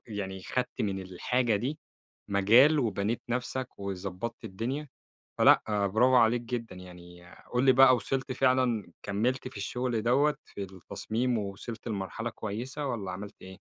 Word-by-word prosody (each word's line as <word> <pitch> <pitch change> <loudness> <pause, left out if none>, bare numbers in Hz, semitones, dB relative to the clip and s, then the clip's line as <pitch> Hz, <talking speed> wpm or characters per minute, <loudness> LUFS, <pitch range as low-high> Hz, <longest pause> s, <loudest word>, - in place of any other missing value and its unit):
يعني 95 -3 -5
خدت 125 +5 -3
من 100 -2 -1
الحاجة 110 +5 0
دي 135 +8 -3 0.5
مجال، 115 +10 +5
وبنيت 110 -2 0
نفْسَك، 125 +1 -2
وضبطت 100 +4 -5
الدنيا، 120 +9 -4 0.5
فلأ - - +6 0.2
برافوعليك 120 +2 +4
جدًا 115 -2 -5
يعني، 90 -1 -12 0.3
قُل 125 - +2
لي 135 - +7
بقى 130 0 +7
وصلت 130 +1 -2
فعلًا، 125 -7 +1
كملت 120 +7 -1
في 130 - -9
الشغل 120 +3 -2
دوّة 140 +6 +3
في 100 - -7
التصميم، 105 +6 -3
ووصلت 105 +3 -6
لمرحلة 110 +2 -3
كويسة، 120 +6 -5
والَّا 100 -7 -3
عملت 100 +3 -7
إيه؟ 95 - -10
115 Hz, 135 wpm, -29 LUFS, 100-125 Hz, 0.5 s, لي